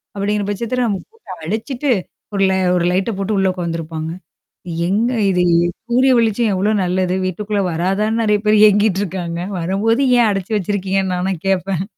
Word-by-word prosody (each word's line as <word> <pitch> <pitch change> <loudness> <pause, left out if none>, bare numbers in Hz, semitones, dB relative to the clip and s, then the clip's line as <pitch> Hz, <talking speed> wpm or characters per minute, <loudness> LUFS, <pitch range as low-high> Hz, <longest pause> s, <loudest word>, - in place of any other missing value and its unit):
அப்படிங்கிற 205 +1 -1
பட்சத்தில 235 +5 -1
நம்ம 200 -3 -1
போட்டு 455 0 -22 0.2
அடைச்சுட்டு, 240 - -2 0.4
ஒரு 200 - -1
ல - - +2 0.2
ஒரு 175 -1 +1
லைட்ட 190 +5 0
போட்டு 200 +2 -1
உள்ள 190 0 +2
உக்காந்துருப்பாங்க. 165 -2 -4 0.8
எங்க 220 +6 +1 0.2
இது 180 -2 +2 0.5
சூரிய 255 +2 +4
வெளிச்சம் 225 -1 +2
எவ்ளோ 205 +3 +1
நல்லது! 180 0 0
வீட்டுக்குள்ள 200 +3 -2
வராதான்னு 195 +7 0
நெறையா 210 -2 +2
பேர் 210 0 +5
ஏங்கிட்டுருக்காங்க. 190 -4 0 0.2
வரும்போது 200 +8 +1 0.2
ஏன் 230 -2 +4
அடைச்சு 195 +1 -4
வச்சிருக்கீங்கன்னு 195 -1 -1
நாலாம் 180 -1 -2
கேட்பேன். 190 -1 0
195 Hz, 145 wpm, -18 LUFS, 185-215 Hz, 0.8 s, பேர்